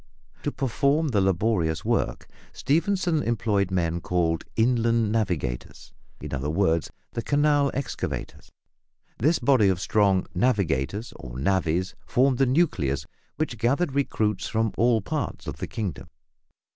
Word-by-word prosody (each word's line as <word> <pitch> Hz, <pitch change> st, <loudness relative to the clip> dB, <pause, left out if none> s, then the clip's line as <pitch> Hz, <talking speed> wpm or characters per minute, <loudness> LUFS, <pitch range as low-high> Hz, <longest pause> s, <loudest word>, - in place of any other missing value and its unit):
To -, -, -2 dB
perform 140 Hz, +4 st, +1 dB
the 105 Hz, -6 st, +2 dB
laborious 95 Hz, -4 st, +1 dB
work, -, -, -1 dB, 0.3 s
Stephenson 170 Hz, +1 st, +1 dB
employed 105 Hz, -5 st, +1 dB
the 95 Hz, -, -4 dB
men 85 Hz, -1 st, 0 dB
called 85 Hz, -2 st, 0 dB
"inland 115 Hz, -1 st, +2 dB
navigators," 90 Hz, -, -3 dB, 0.3 s
in -, -, -7 dB
other 70 Hz, +2 st, -2 dB
words, 85 Hz, -1 st, +1 dB, 0.2 s
the 115 Hz, -, -3 dB
canal 145 Hz, +1 st, +2 dB
excavators. 135 Hz, 0 st, -5 dB, 0.7 s
This 155 Hz, +8 st, +3 dB
body 130 Hz, -8 st, +4 dB
of 95 Hz, -2 st, 0 dB
strong 100 Hz, -1 st, +2 dB
"navigators" 100 Hz, -, 0 dB
or -, -, -8 dB
"navvies" 90 Hz, +3 st, 0 dB
formed 130 Hz, 0 st, +2 dB
the 135 Hz, -, +4 dB
nucleus, 80 Hz, -, +1 dB, 0.3 s
which 135 Hz, -7 st, -3 dB
gathered 135 Hz, +6 st, +1 dB
recruits 110 Hz, -7 st, 0 dB
from 110 Hz, -1 st, 0 dB
all 115 Hz, -1 st, +3 dB
parts -, -, -4 dB
of -, -, -5 dB
the -, -, -4 dB
kingdom. 100 Hz, -9 st, -5 dB
110 Hz, 130 wpm, -25 LUFS, 90-130 Hz, 0.7 s, body